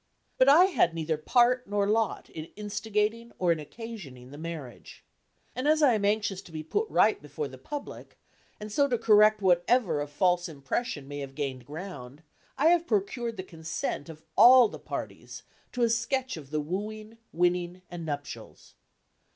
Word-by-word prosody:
But 260 - +6
I 325 +6 +8
had 250 - +2
neither 160 -1 -1
part 245 +10 +2
nor 205 0 0
lot 220 +1 0
in 155 - -7
instigating 210 +2 -2
or 180 -2 +2
in 165 - +1
occasioning 150 - -9
the 145 - -10
marriage. 155 -7 -8 0.5
And 255 +4 -2
as 310 0 +4
I 265 -4 +6
am 210 -2 0
anxious 205 -2 0
to 180 - -16
be 155 -1 -6
put 420 - -1
right - - +3
before 450 - -5
the - - -12
public, 290 -1 -8 0.4
and 210 0 -7
so 280 +6 +3
to 245 -3 0
correct 215 -1 +5
whatever 180 -1 +3
of 145 - -4
false 175 +3 +1
impression 145 - -4
may 145 0 -6
have 135 -1 -7
gained 130 -4 -4
ground, 150 -4 -8 0.3
I 305 +4 +4
have 345 -1 +3
procured 225 +2 -1
the 185 - -4
consent 165 -3 -5
of 160 0 -11
all 245 +1 +8
the - - -9
parties - - -7 0.3
to 245 - 0
a 235 - +4
sketch 260 +3 -1
of 145 -5 -10
the 155 0 -1
wooing, 215 +7 -6
winning 175 +1 0
and 175 -1 -6
nuptials. 145 -3 -7
200 Hz, 175 wpm, -28 LUFS, 160-235 Hz, 0.5 s, I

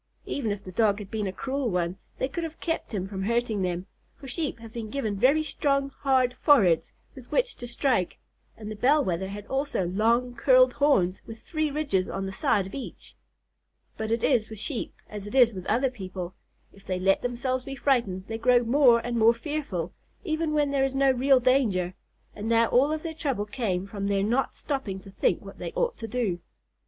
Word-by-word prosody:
Even 235 -7 -2
if 205 0 -4
the 185 - -8
Dog 205 +1 +2
had 205 -2 -9
been 215 -2 -2
a - - -2
cruel 265 +5 -2
one, 180 -2 -1 0.2
they 260 - 0
could 335 +5 -4
have 325 0 -6
kept 325 -1 -3
him 190 -4 -3
from 190 -1 -5
hurting 230 0 0
them, 180 0 -2 0.3
for 275 - -12
Sheep 300 -1 -2
have 230 -1 -12
been 225 -2 -5
given 220 -5 -2
very 275 +9 +4
strong, 275 -2 0
hard 260 -3 +2
foreheads 195 - +4 0.2
with 260 -3 -13
which - - +1
to 245 - -7
strike, 235 -6 0 0.4
and 215 -1 -7
the - - -5
Bell 275 +6 +3
Wether 185 +1 -1
had 205 +1 -7
also 270 -7 -1
long, 230 +7 +1
curled 255 +1 +5
horns 200 -11 +2
with 225 0 -10
three 310 -2 -1
ridges 280 -11 0
on 195 0 -3
the 195 - -4
side 195 0 +1
of 190 - -10
each. 275 - -8 0.8
But 220 0 -4
it 230 0 0
is 235 -6 +2
with 220 - -8
Sheep 235 +4 -3 0.2
as 210 -1 -7
it 205 - -7
is 245 -3 +6
with 185 -2 -7
other 250 +4 +2
people, 185 -5 -6 0.4
if 195 - -18
they 185 -2 -2
let 195 +1 +3
themselves 250 +1 -2
be 275 - -6
frightened 235 -10 0
they 225 +1 -5
grow 245 +1 +4
more 240 -1 +4
and 240 -1 -1
more 230 +1 +6
fearful, 235 - -4 0.3
even 320 -3 -1
when 295 -2 +2
there 275 -1 +2
is 270 0 0
no 270 0 +4
real 265 +1 +4
danger 230 -9 +2 0.4
and 210 +2 -5
now 230 0 +4
all 270 +5 +4
of 310 0 -2
their 330 -1 -4
trouble 275 -9 -2
came 205 -5 -2
from 200 0 -4
their 200 -1 +1
not 240 +6 0
stopping 265 -10 -3
to 195 - -13
think - - 0
what - - -11
they - - -4
ought - - 0
to 225 - -6
do. 220 -7 -1
235 Hz, 210 wpm, -27 LUFS, 200-275 Hz, 0.8 s, is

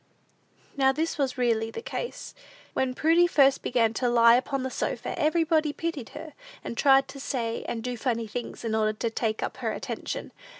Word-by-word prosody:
Now 265 -1 +4
this 310 +2 -2
was 270 -2 0
really 230 -3 +1
the 455 - -7
case. 485 - -5 0.4
When 255 -1 0
Prudy 330 +4 +4
first 275 -5 +4
began 230 -2 +1
to 245 +2 0
lie 235 -1 +6
upon 265 +1 -1
the 260 - -3
sofa, - - -3
everybody 315 -1 +2
pitied 325 -8 -4
her, 315 - -9 0.3
and - - -5
tried 270 +2 +5
to 275 - -9
say 235 -4 -3
and 225 -1 -3
do 250 0 -3
funny 230 -1 -1
things, 235 +2 -6
in 220 - -1
order 215 -1 +2
to 225 +2 -2
take 220 -1 -1
up - - -4
her - - -2
attention. - - -5
255 Hz, 185 wpm, -27 LUFS, 230-290 Hz, 0.4 s, lie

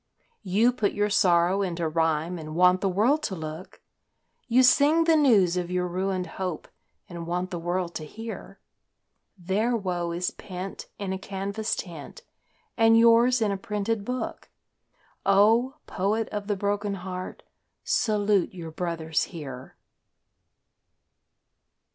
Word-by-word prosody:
You 215 +5 +2
put 210 -4 0
your 205 0 0
sorrow 180 0 +3
into 170 -3 -2
rhyme 160 +2 0
and 155 0 -7
want 180 +1 +4
the 195 - +1
world 230 +11 +2
to 210 -11 -3
look; 160 +1 -8 0.6
You 250 +2 +4
sing 295 +6 +5
the 325 -1 +4
news 210 - +4
of 175 -1 -2
your 180 0 -1
ruined 185 +1 -2
hope 185 -4 -5 0.4
and 170 -2 -7
want 180 +1 -2
the 175 - -3
world 175 +1 -2
to 155 - -8
hear; 225 +8 -9 0.8
Their 205 +7 0
woe 180 -4 -2
is 175 +1 -2
pent 185 0 -8
in 195 -2 -3
a 190 - -4
canvas 200 +3 -3
tent 165 -6 -8 0.5
and 225 -1 +5
yours 235 +1 +5
in 210 - +1
a 200 - -2
printed 210 +1 -2
book. 250 +4 -5 0.7
O, 225 +7 +4
poet 210 +4 -1
of 205 -1 -5
the 205 - 0
broken 205 +1 -1
heart, 185 0 -7 0.4
salute 205 -4 +1
your 165 -3 -7
brothers 160 -1 -2
here! 135 -7 -9
190 Hz, 135 wpm, -26 LUFS, 175-215 Hz, 0.8 s, sing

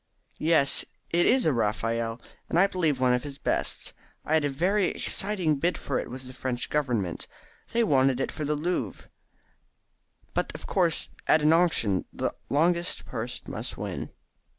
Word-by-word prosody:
"Yes, 155 -3 +3 0.3
it 175 +1 +3
is 255 +1 +4
a 155 - +4
Raphael, 115 +1 0 0.3
and - - +1
I 185 - +7
believe 165 -8 0
one 130 -1 +4
of 125 - +1
his 140 0 -7
best. - - -1 0.3
I 155 - 0
had 160 -1 +4
a 145 - +1
very 185 +8 +2
exciting 185 -7 0
bid 170 +6 +1
for 140 - -2
it - - -5
with 130 +2 -8
the 130 - -10
French 125 -1 -3
Government. 120 - -1 0.4
They 235 0 +3
wanted 135 - +3
it - - -1
for 155 - -5
the 150 +1 0
Louvre, 175 +5 -3 1.2
but - - 0
of - - -8
course 175 -5 +2 0.2
at 155 - +5
an 155 +1 +6
auction 160 - +3
the - - -2 0.2
longest 170 +4 +1
purse 120 0 -5
must - - -5
win." - - -4
150 Hz, 170 wpm, -27 LUFS, 125-170 Hz, 1.2 s, I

